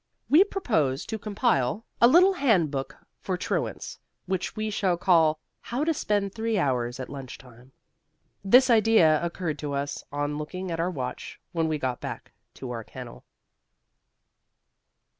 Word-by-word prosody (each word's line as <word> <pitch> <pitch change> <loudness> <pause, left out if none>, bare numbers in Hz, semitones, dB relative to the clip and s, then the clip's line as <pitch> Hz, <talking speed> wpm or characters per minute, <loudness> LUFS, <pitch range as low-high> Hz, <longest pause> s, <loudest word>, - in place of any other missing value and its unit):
We 320 +6 +8
propose 160 - -1
to 220 -1 -5
compile 210 - 0 0.2
a 235 - +9
little 360 +8 +6
handbook 170 - 0 0.2
for - - -3
truants, - - -3 0.3
which 185 0 -3
we 215 0 -2
shall 190 -4 0
call 165 -4 +3 0.2
"How 245 +5 -3
to 325 +1 +1
Spend 205 -7 -1
Three 225 -1 -1
Hours 125 -6 -1
at 130 - -5
Lunch 135 -3 -8
Time." 125 0 -17 0.7
This 250 +6 +6
idea 215 -9 +4
occurred 170 -3 -3
to 145 -2 -4
us 140 +1 -3
on 145 +1 -2
looking 185 +4 -5
at 165 - -3
our 170 +2 +1
watch 130 -7 -6
when 165 -2 0
we 155 -1 -1
got 130 -4 -3
back - - -7 0.2
to 130 -2 -7
our 115 -2 -5
kennel. 60 - -11
170 Hz, 150 wpm, -26 LUFS, 140-220 Hz, 0.7 s, a